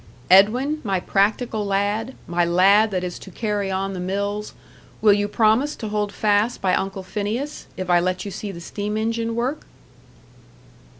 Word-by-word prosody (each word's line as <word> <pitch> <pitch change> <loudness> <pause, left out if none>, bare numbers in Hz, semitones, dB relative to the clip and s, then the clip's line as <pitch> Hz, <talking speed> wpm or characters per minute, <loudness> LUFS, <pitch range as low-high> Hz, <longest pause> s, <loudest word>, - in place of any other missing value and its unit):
Edwin, 250 +11 +5
my 195 -4 0
practical 210 +4 0
lad, 205 +5 -1
my 175 0 0
lad 195 +5 +4
that 185 -3 -2
is 180 -1 -5
to - - -11
carry 205 0 -2
on 195 +1 -2
the 185 - -5
mills 200 +3 -3 0.4
will 210 -2 +5
you 205 0 +1
promise 225 +7 +2
to 220 - -6
hold 210 -1 -1
fast 210 +3 +1
by 185 -2 +1
Uncle 195 0 -2
Phineas, 215 +9 -4
if 185 - -4
I 175 -1 +4
let 185 +2 -1
you 200 - -5
see 200 +2 -5
the 170 -2 -9
steam 210 +4 -4
engine 230 +1 -1
work?" 250 +6 -2
205 Hz, 170 wpm, -22 LUFS, 190-220 Hz, 0.4 s, Edwin